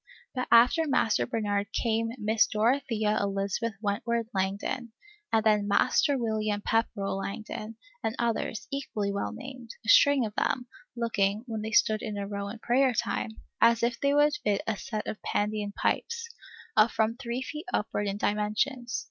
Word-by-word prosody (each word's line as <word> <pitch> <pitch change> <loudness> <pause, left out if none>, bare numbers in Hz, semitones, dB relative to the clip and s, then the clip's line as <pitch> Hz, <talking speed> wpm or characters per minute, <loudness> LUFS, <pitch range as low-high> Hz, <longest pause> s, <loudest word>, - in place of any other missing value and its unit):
But 255 -1 -2
after 245 +8 +5
Master 225 -6 +2
Bernard 205 -3 -1
came 225 -1 0
Miss 220 0 +3
Dorothea 220 -2 +1
Elizabeth 200 +3 -1
Wentworth 225 +3 -1
Langdon, 200 +5 -2 0.4
and 225 -1 +3
then 210 -2 +3
Master 270 +7 +3
William 215 -3 -1
Pepperell 205 -3 0
Langdon, 215 +2 -5 0.3
and 220 - -1
others, 230 -2 -1
equally 220 -7 -2
well 200 - -2
named, 250 0 -9 0.2
a - - -3
string 285 -1 +6
of 210 - -5
them, 250 +3 0 0.3
looking, 215 -3 0
when 225 -3 -4
they 215 - -3
stood 215 0 +3
in 210 -2 -4
a 200 - -3
row 200 0 -4
in 210 +3 -6
prayer 250 +3 +2
time, 220 0 -2 0.2
as 230 0 +5
if 235 0 +1
they 280 0 +2
would 295 0 +5
fit 205 -1 +1
a 220 - 0
set 215 +1 -5
of 215 - -5
Pandean 210 0 -1
pipes, 470 0 -1 0.5
of 215 +1 +5
from 220 0 +1
three 245 0 -4
feet 305 +6 -7
upward 205 -1 -1
in 200 0 -2
dimensions. 235 +5 0
220 Hz, 165 wpm, -28 LUFS, 210-240 Hz, 0.5 s, string